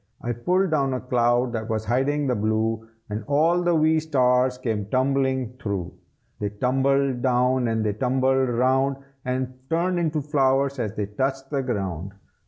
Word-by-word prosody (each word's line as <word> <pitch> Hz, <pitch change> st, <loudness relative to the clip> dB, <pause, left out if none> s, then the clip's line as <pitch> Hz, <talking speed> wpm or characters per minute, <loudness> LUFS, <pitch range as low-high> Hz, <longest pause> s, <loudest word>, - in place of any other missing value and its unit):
I 120 Hz, -, -3 dB
pulled 180 Hz, -, +1 dB
down 135 Hz, -4 st, +1 dB
a -, -, -2 dB
cloud 120 Hz, 0 st, +1 dB
that 110 Hz, 0 st, -4 dB
was 110 Hz, -1 st, -2 dB
hiding 135 Hz, +5 st, +1 dB
the 130 Hz, -, +1 dB
blue, 110 Hz, +1 st, -1 dB, 0.2 s
And 105 Hz, +1 st, -3 dB
all 165 Hz, +5 st, +3 dB
the 175 Hz, -1 st, +2 dB
wee 160 Hz, 0 st, +3 dB
stars 125 Hz, -4 st, +2 dB
came 110 Hz, -5 st, -2 dB
tumbling 130 Hz, 0 st, 0 dB
through. 95 Hz, -5 st, -3 dB, 0.5 s
They 105 Hz, -, -1 dB
tumbled 130 Hz, +3 st, +1 dB
down 125 Hz, 0 st, +2 dB
and 110 Hz, -1 st, 0 dB
they 105 Hz, -, +1 dB
tumbled 130 Hz, +3 st, +1 dB
round, 130 Hz, +3 st, +2 dB, 0.3 s
And 130 Hz, 0 st, -2 dB, 0.2 s
turned 175 Hz, +2 st, +1 dB
into 160 Hz, -2 st, 0 dB
flowers 135 Hz, -1 st, +1 dB
as 110 Hz, -3 st, -3 dB
they 105 Hz, -, -1 dB
touched 135 Hz, +6 st, -3 dB
the 140 Hz, -2 st, 0 dB
ground. 95 Hz, -7 st, -3 dB
130 Hz, 165 wpm, -24 LUFS, 115-140 Hz, 0.5 s, all